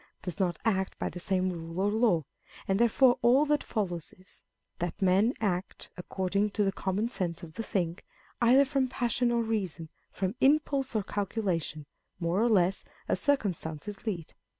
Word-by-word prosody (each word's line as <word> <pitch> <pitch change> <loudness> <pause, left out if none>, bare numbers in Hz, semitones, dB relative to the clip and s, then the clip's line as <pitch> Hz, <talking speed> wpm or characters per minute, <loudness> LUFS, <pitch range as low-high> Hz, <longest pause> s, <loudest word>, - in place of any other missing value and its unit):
does 180 +1 -5
not 180 -3 +1
act 190 -4 0
by - - -2
the 180 - -8
same 185 0 +1
rule 165 0 -6
or 200 +2 +2
law; 215 -7 +3 0.4
and 195 +1 +1
therefore 245 +2 +4
all 260 +5 +5
that 295 0 +1
follows 175 -7 -3
is, 185 0 -20 0.4
that 175 +1 -3
men 195 +4 +4
act 190 -4 -2
(according 190 +3 -1
to 210 +1 0
the 195 - +2
common 195 +4 -1
sense 185 -6 -4
of 160 -2 -9
the 225 - -4
thing) 180 -6 -2 0.4
either 255 +4 +6
from 270 -1 +1
pussion 245 -1 0
or 235 -1 +2
reason, 190 -8 -3 0.2
from 190 0 -2
impulse 275 -2 +2
or 215 - +1
calculation, 185 -7 -2 0.3
more 175 +3 +1
or 240 - +3
less, 190 -3 +2 0.2
as - - +1
circumstances 195 - -1
lead. 170 -7 -3
195 Hz, 170 wpm, -29 LUFS, 180-235 Hz, 0.4 s, either